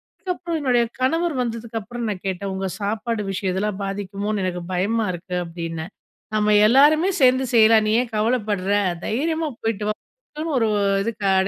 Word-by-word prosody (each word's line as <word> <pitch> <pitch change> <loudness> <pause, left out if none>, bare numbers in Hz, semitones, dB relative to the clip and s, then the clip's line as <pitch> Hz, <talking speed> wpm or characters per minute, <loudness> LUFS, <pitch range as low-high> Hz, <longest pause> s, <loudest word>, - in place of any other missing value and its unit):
அதுக்கப்புறம் 360 -3 -3
என்னுடைய 250 -4 +3 0.2
கணவர் 325 +5 +1
வந்ததுக்கப்புறம் 230 0 -4
நான் 195 -3 -5
கேட்டேன். 190 +1 -3
உங்க 190 0 -2
சாப்பாடு 220 +2 -2
விஷயம் 190 -1 -2
இதெல்லாம் 200 +1 -2
பாதிக்குமோன்னு, 200 +1 -3
எனக்கு 180 -1 -3
பயமா 215 +5 +1
இருக்கு 180 +1 -5
அப்டின்னேன். 165 +1 -6 0.4
நம்ம 210 0 +3
எல்லாருமே 295 - +5
சேர்ந்து 260 0 +5
செய்யலாம் 220 -1 +6
நீ 215 - +2
ஏன் 240 -2 -12
கவலப்பட்ற? 210 -3 0 0.3
தைரியமா 315 +6 -1
போய்ட்டு 215 -2 -2
வான்னு 310 - -7
ஒரு 225 - +2 0.4
இதுக்கு 225 -1 -4
அட 190 0 +3
215 Hz, 145 wpm, -22 LUFS, 195-255 Hz, 0.4 s, செய்யலாம்